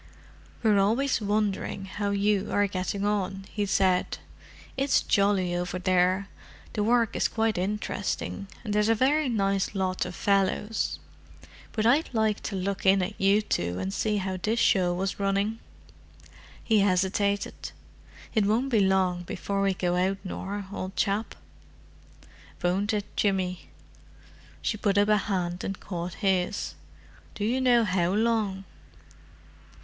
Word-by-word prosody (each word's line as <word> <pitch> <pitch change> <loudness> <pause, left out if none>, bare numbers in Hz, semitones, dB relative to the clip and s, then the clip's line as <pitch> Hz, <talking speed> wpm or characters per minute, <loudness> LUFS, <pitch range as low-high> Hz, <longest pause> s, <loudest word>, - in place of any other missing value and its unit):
"We're 210 -3 +4
always 230 +6 +2
wondering 205 -2 -1
how 205 +1 -3
you 200 0 +1
are 205 - +3
getting 195 +1 -2
on," 195 -2 -1
he 205 -1 -1
said. 190 -2 +2 0.6
"It's 270 +1 +2
jolly 195 -3 +2
over 180 +1 -2
there—the 185 +3 -1
work 230 0 +2
is - - +2
quite 225 -1 0
interesting, 200 +1 -3 0.2
and 210 -3 -3
there's 210 +1 +2
a 225 - +4
very 275 +4 +2
nice 195 -3 0
lot 185 -1 0
of 180 - -7
fellows: 200 +3 0 0.7
but 215 -1 -1
I'd 275 +8 +3
like 220 -2 +1
to 200 - -5
look 190 +1 -2
in 190 0 +4
at 200 +3 -5
you 200 +2 +4
two 90 - -1
and 95 +1 -3
see 215 -1 0
how 190 -1 -2
this 225 +4 0
show 185 -5 +3
was 190 +3 -2
running." 200 +3 0 1.0
He 220 -2 +3
hesitated. 200 +1 0 0.6
"It 210 -2 +2
won't 235 +6 +1
be 225 - +4
long 190 -2 +2
before 195 +3 -3
we 195 -1 +2
go 180 -1 0
out, 190 +2 +1
Nor, 200 +1 -5
old 185 0 -5
chap." 205 +3 -1 1.3
"Won't 190 +5 +1
it, 210 -2 -1
Jimmy?" 185 -3 -1 0.9
She 215 - -1
put 200 -1 +1
up 205 +1 +4
a 210 - +5
hand 180 -3 -2
and 195 - -4
caught 175 -1 -5
his. 185 -2 0 0.6
"Do 205 - -2
you 250 +4 +1
know 245 -2 +4
how 180 -3 +1
long?" 215 -3 0
200 Hz, 145 wpm, -27 LUFS, 185-215 Hz, 1.3 s, a